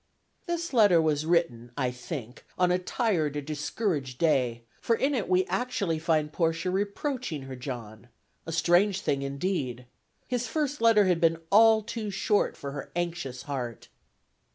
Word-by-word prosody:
This 340 -2 -3
letter 205 -8 +6
was 155 -1 +1
written 145 -9 +1
(I 130 -3 0
think) 125 -1 -7
on 180 -1 +3
a 180 - +2
tired 180 - 0
or - - -1
discouraged 150 - -2
day, 125 -7 +1 0.2
for 230 - +2
in 275 +5 +1
it 230 -9 -1
we 185 0 +3
actually 200 -10 -1
find 155 -2 0
Portia 165 +2 0
reproaching 200 - -2
her 135 -1 -7
John, 120 -3 -7 0.4
a - - -3
strange 175 +4 +3
thing 140 -8 0
indeed. 140 -3 -2 0.4
His 245 -1 -1
first 295 -3 -2
letter 225 -3 +6
had 180 -2 +2
been 165 -1 +4
all 220 +1 +6
too 225 -1 -4
short 200 +1 +1
for 140 - -6
her 140 0 -7
anxious 165 -7 -3
heart. 130 -5 -5
165 Hz, 155 wpm, -28 LUFS, 140-205 Hz, 0.4 s, letter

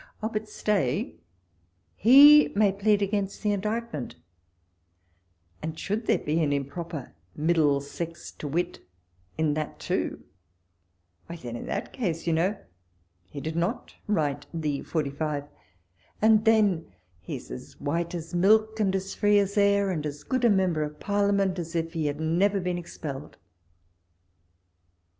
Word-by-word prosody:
Oh! 220 - 0
but 215 -1 -4
stay, 180 - 0 0.8
he 285 +6 +8
may 205 -1 +4
plead 200 +1 +2
against 200 0 -2
the 210 - +2
indictment, 210 - -3 1.5
and 160 0 -5
should 215 +6 -3
there - - +4
be 155 +3 -1
an 150 -2 +1
improper 145 +1 -4 0.2
MiihUcscr 155 +1 0
t(i 150 - -4
irit 170 +5 -1 0.6
in 155 -2 +1
that 155 0 -4
too, - - -2 1.0
why 170 - -6
then 120 -8 -7
in - - -6
that 200 - -4
case, 175 -10 -2
you 170 - +1
know, 185 +6 +1 0.7
he 140 - -7
did 160 +3 -4
not 175 +8 -2
write 150 -8 0
the 150 -4 -2
45, 150 -1 -2 0.8
and 220 0 +4
then 205 - +3 0.3
he 85 - -6
is - - -10
as 60 - -9
white 170 +4 -2
as 165 -1 -7
milk, 215 +4 +3
and 195 -3 +2
as 190 0 -3
free 205 0 +3
as 200 0 +1
air, 200 -1 +3
and 155 -4 -2
as 145 0 -7
good 255 - -1
a 240 - +6
member 180 -7 +1
f)f 150 - -20
Parliament 200 -2 +1
as 170 0 -6
if 165 0 -1
he 160 -3 -1
had 145 +1 -3
never 180 +6 +2
been 180 -1 -2
expelled. 150 -4 -7
175 Hz, 145 wpm, -27 LUFS, 155-205 Hz, 1.5 s, he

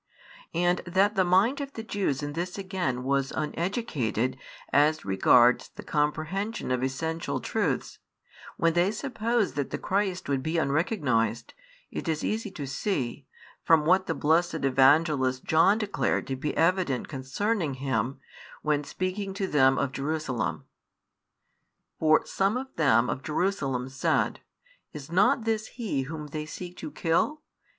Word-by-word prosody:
And 175 +1 +2
that 195 +4 +3
the 190 -3 +3
mind 195 +11 +3
of 280 0 -6
the 225 - -6
Jews 190 - -1
in 145 0 -4
this 175 +4 -4
again 185 -10 -2
was 135 0 0
uneducated 150 - -1 0.4
as 150 0 +3
regards 120 +6 +4
the - - -11
comprehension 155 - -1
of 125 -1 0
essential 160 +5 -2
truths, - - -2 0.6
when 165 -1 +2
they 175 +3 +3
supposed 230 - -1
that 145 - -1
the - - -3
Christ 190 -2 -1
would 140 -2 0
be 160 +4 -1
unrecognised, 140 - 0 0.4
it - - -5
is 160 -1 -1
easy 220 0 -2
to 150 -7 -6
see, 135 - -3 0.4
from 160 -2 +4
what 185 +3 +3
the 165 - -1
blessed 165 +4 +2
Evangelist 135 -1 +3
John 165 +6 +4
declared 210 -2 -1
to 135 - -3
be 145 +3 -3
evident 165 -6 +1
concerning 150 - -2
Him, 130 -1 -2 0.4
when 150 -1 +1
speaking 185 +5 -3
to 195 - -1
them 135 -6 +4
of 130 - 0
Jerusalem. 135 - -2 1.4
For 155 -1 +4
some 195 +4 0
of 265 +1 -7
them 125 -6 +4
of 130 - -3
Jerusalem 140 -6 -1
said, 135 +1 0 0.5
Is 150 +1 -9
not 230 +8 +3
this 220 -1 -1
He 220 - -3
Whom 155 -2 -5
they 150 +1 -5
seek 180 +2 -8
to - - -6
kill? 170 - 0
160 Hz, 145 wpm, -27 LUFS, 135-195 Hz, 1.4 s, regards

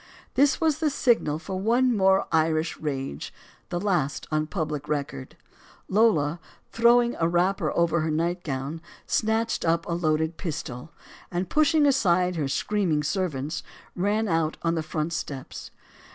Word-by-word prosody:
This 280 +1 +3
was 315 -3 +1
the 315 -2 +2
signal 235 - +2
for 185 +3 -5
one 240 +4 +2
more 190 -1 +3
Irish 160 0 +1
rage, 135 - -4 0.4
the 175 - -2
last 175 -8 0
on 155 0 0
public 150 -4 -3
record. 140 -3 -4 0.5
Lola, 175 -7 +2 0.3
throwing 235 +1 +4
a 165 - +3
wrapper 175 +3 +1
over 170 -1 +2
her 160 - -1
nightgown, 160 -2 -2 0.2
snatched 225 +1 0
up 165 0 +1
a - - -5
loaded 160 -1 0
pistol, 150 -6 -5 0.4
and, 180 +1 -3
pushing 310 0 +4
aside 185 -10 +3
her 150 -4 -1
screaming 165 0 0
servants, 155 -3 -2 0.3
ran 210 +4 0
out 165 -3 0
on 165 0 +1
the 165 - -1
front 155 +1 -3
steps. 145 -4 -6
170 Hz, 140 wpm, -26 LUFS, 155-205 Hz, 0.5 s, throwing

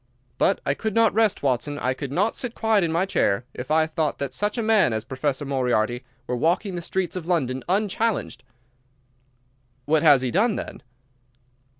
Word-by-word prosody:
But - - +2
I 140 - +2
could 215 +7 -4
not 230 -1 +4
rest, 220 -5 +2
Watson, 140 +2 0
I 130 -2 0
could 135 0 -6
not 200 +9 +1
sit 245 -2 -4
quiet 220 -3 +2
in 165 - 0
my 170 +3 +1
chair, 115 - 0
if 125 - -7
I 155 +1 +3
thought 155 -1 -2
that 140 -2 -4
such 210 - -1
a 230 - 0
man 215 - +3
as 110 -1 -2
Professor 135 +3 -3
Moriarty 125 -3 0 0.2
were 125 - -2
walking 175 - 0
the 175 - -4
streets 180 0 -2
of 175 -3 -5
London 130 -8 0
unchallenged." 210 +3 0 1.4
"What 155 +1 +2
has 145 -5 +6
he 125 - -1
done, 210 +4 +2
then?" - - -6
160 Hz, 185 wpm, -24 LUFS, 130-205 Hz, 1.4 s, has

